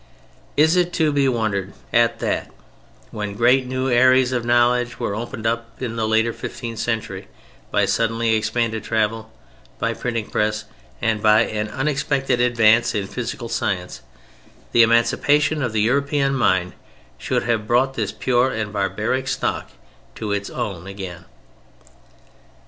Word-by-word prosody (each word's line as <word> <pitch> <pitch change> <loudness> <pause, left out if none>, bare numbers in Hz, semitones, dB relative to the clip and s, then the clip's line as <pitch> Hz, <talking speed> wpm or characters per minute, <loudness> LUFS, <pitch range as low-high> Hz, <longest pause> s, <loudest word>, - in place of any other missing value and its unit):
"Is 160 +3 +5
it 180 -1 +1
to 155 -2 +2
be 140 -1 +2
wondered 105 -5 -1 0.2
at 115 0 +3
that - - -1 0.6
when 105 -2 -5
great 125 +4 +3
new 130 +1 -2
areas 130 +1 +4
of 120 -2 -1
knowledge 120 0 +2
were - - -2
opened 115 +1 -6
up 115 0 0
in 120 -3 -4
the 110 -1 -1
later 110 +1 +2
fifteenth 115 -3 -6
century 110 -5 -3 0.4
by - - +2
suddenly 115 0 +1
expanded 110 0 -1
travel, 110 0 -1 0.5
by - - -1
the - - -15
printing 115 -3 -2
press, 105 0 0 0.4
and 110 -1 +1
by 110 0 +5
an 105 -2 -1
unexpected 135 -1 0
advance 120 -1 +4
in 100 -2 -1
physical 120 +2 -5
science, 95 - -3 0.7
the 120 - +5
emancipation 145 +6 +3
of 125 -4 -1
the 110 -1 0
European 140 +4 +1
mind 95 -9 +1 0.5
should - - -1
have 115 -2 -1
brought 130 +3 +2
this 110 -5 -2
pure 125 0 +1
and 105 -3 -4
barbaric 105 +6 -1
stock - - -2 0.5
to 110 -2 -4
its 100 0 -2
own 100 -7 -5
again? 95 -3 -8
115 Hz, 145 wpm, -21 LUFS, 110-125 Hz, 0.7 s, Is